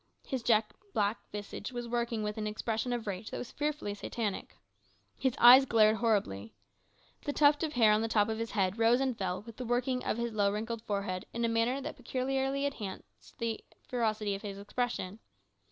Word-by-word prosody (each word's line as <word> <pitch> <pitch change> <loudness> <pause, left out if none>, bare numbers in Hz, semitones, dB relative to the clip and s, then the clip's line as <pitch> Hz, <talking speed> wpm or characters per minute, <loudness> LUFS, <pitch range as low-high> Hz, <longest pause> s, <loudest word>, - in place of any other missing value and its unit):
His 260 -2 -3
jet 220 -2 +2 0.2
black 205 +2 +1
visage 205 +2 -6
was 240 -1 -5
working 235 -2 -1
with 210 +1 -3
an 215 - -2
expression 220 +3 -2
of 240 -2 -2
rage 200 +1 -4
that - - -5
was 245 - -6
fearfully 295 -8 -2
satanic. 205 0 -4 0.6
His 260 -3 0
eyes 255 +3 +9
glared 220 -3 +4
horribly. 110 - 0 0.7
The 290 - -1
tuft 290 0 +4
of 315 -2 -1
hair 225 -5 +5
on 210 +1 +3
the 225 - 0
top 210 -2 +3
of 220 0 -2
his 230 0 -2
head 195 0 0
rose 230 +2 +5
and 265 -2 0
fell 190 -3 -3
with 230 0 -11
the 255 - -4
working 250 +1 0
of - - -1
his 235 -1 -2
low 200 -2 +2
wrinkled 220 +2 -3
forehead 200 -4 -3
in 235 0 0
a - - +3
manner 230 +3 +1
that - - -6
peculiarly 270 +2 -1
enhanced 210 -9 -7
the 230 -1 -3 0.3
ferocity 215 -4 0
of 195 - -5
his 200 -2 -6
expression. 205 -1 -3
225 Hz, 195 wpm, -31 LUFS, 210-245 Hz, 0.7 s, eyes